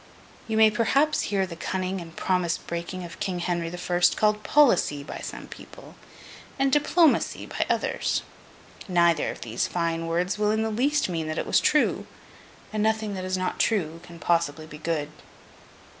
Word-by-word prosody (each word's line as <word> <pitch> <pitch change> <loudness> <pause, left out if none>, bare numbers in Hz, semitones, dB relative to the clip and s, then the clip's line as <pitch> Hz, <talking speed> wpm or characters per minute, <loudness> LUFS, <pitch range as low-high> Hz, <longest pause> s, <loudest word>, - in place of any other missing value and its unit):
You 220 -1 -1
may 220 -1 +6
perhaps 275 +8 +1
hear 195 -2 +1
the 175 -2 -8
cunning 185 +2 -3
and 165 -1 -11
promise 180 -3 0
breaking 170 +2 -5
of 170 0 -9
King 185 -3 -2
Henry 170 -1 -2
the 175 - -7
First, 175 0 +2
called 210 0 +2
'policy' 200 - +3
by - - -7
some - - -7
people, - - -13 0.6
and 270 -1 +2
'diplomacy' 300 +2 +3
by - - -2
others. - - 0 0.6
Neither 170 -4 +3
of - - -7
these 115 0 -2
fine 165 -1 -2
words 180 +5 -1
will 210 0 +2
in 220 +1 +1
the 220 - -1
least 280 +7 +1
mean 165 -3 -3
that 155 +1 -3
it - - -1
was - - +3
true; 300 - +2 0.7
and 215 - -1
nothing 220 -1 0
that 185 -1 -4
is 185 0 -1
not 185 0 -2
true 165 -7 0
can 175 -1 -12
possibly 165 -3 0
be 155 -1 -11
good. 155 -2 -2
180 Hz, 175 wpm, -26 LUFS, 170-215 Hz, 0.7 s, may